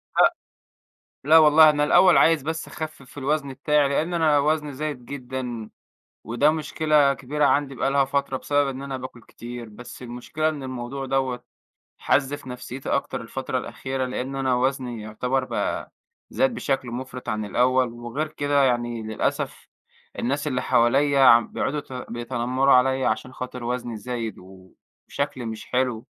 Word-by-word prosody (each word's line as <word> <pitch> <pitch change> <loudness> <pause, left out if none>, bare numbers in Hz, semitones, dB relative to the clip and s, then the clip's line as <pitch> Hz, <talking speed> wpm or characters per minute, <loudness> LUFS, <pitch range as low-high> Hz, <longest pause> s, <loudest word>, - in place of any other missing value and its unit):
لأ، - - +5 0.9
لا 155 +3 +7
والله 155 0 +8
أنا 150 -1 +1
الأول 180 +5 +6
عايز 165 -3 +5
بس 160 +3 -4
أخفِّف 155 -3 -8
الوزن 140 0 -1
بتاعي، 145 +2 +2
لإن 160 +5 -1
أنا 155 -3 +3
وزني 150 0 0
زايد 145 -2 -5
جدًا، 125 -4 -6 0.5
وده 120 +7 +3
مشكلة 155 -2 +2
كبيرة 145 +2 -1
عندي 140 -1 +2
بقى 135 +1 0
لها 140 0 +3
فترة، 140 0 -1
بسبب 145 +1 +1
إن 135 0 -5
أنا 140 -1 -4
باكُل 130 -2 -9
كتير، 120 0 -9
بس 120 +4 -11
المشكلة 125 +6 -2
إن 150 -3 -4
الموضوع 130 +1 -5
دوّة 130 -2 -1 0.5
حَزّ 140 0 +1
في 145 -2 -9
نفسيّتي 125 +1 -7
أكتر 140 - -1
الفترة 130 +3 -3
الأخيرة، 130 +1 -4
لإن 130 +2 -4
أنا 130 -2 +1
وزني 125 -2 -1
يعتبر 125 +5 -1
بقى - - -3 0.4
زاد 265 -2 +1
بشكل 135 - -2
مُفرِط 125 +1 -7
عن 110 0 -1
الأول، 125 +3 +2
وغير 120 +6 -4
كده 145 -2 +1
يعني 120 -2 0
للأسف 110 0 -3 0.5
الناس 140 +5 -1
اللي 130 -4 -1
حواليّا 140 +4 +3
عم 120 -3 +7
بيقعدوا 150 - -2
يت 140 - -8 0.2
بيتنمروا 120 +3 +1
عليّا، 130 +1 +3
عشان 130 - -2
خاطر 125 -1 -7
وزني 120 -1 -3
زايد 115 0 -5
وشكلي 95 +8 -7
مش 110 -1 -6
حلو، 125 -3 -1
130 Hz, 155 wpm, -24 LUFS, 120-145 Hz, 0.9 s, والله